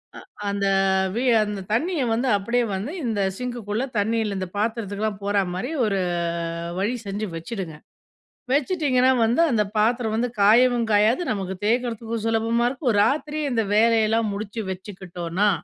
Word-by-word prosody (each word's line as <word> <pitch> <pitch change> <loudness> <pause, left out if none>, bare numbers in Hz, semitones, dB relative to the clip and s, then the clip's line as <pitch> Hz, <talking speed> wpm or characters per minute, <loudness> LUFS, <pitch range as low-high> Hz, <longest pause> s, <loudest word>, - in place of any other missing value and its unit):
அ - - -8 0.3
அந்த 200 0 -1 0.5
வி 240 - 0 0.2
அந்த 205 -2 -4
தண்ணீய 310 +8 +1
வந்து 235 +4 0
அப்படியே 235 +5 0
வந்து 205 +9 -4
இந்த 220 -4 0 0.2
சிங்க்குக்குள்ள 240 -3 -3
தண்ணீல 215 0 0
இந்த 185 -1 -3
பாத்திரத்துக்குலாம் 210 -2 -2
போற 205 0 0 0.2
மாரி 195 - -3
ஒரு 200 -2 0 0.8
வழி 210 +5 0
செஞ்சு 200 +2 -3
வெச்சுடுங்க. 170 -1 -5 0.8
வெச்சிட்டீங்கன்னா, 275 -3 +2
வந்து 235 +8 +2
அந்த 220 -3 +3
பாத்திரம் 225 +1 +1
வந்து 240 +2 0
காயவும் 235 +3 +5
காயாது. 215 +8 +4
நமக்கு 190 -3 -3
தேய்க்கிறதுக்கும் 230 -1 -1
சுலபமா 225 +1 +1
இருக்கும். 260 0 -2
ஒரு 205 - +1
ராத்திரி 300 +4 -1
இந்த 230 -2 +1
வேலையெல்லாம் 225 0 +3
முடிச்சு 210 +2 -5
வெச்சுக்கிட்டோனா, 185 0 -2
220 Hz, 140 wpm, -23 LUFS, 205-240 Hz, 0.8 s, காயவும்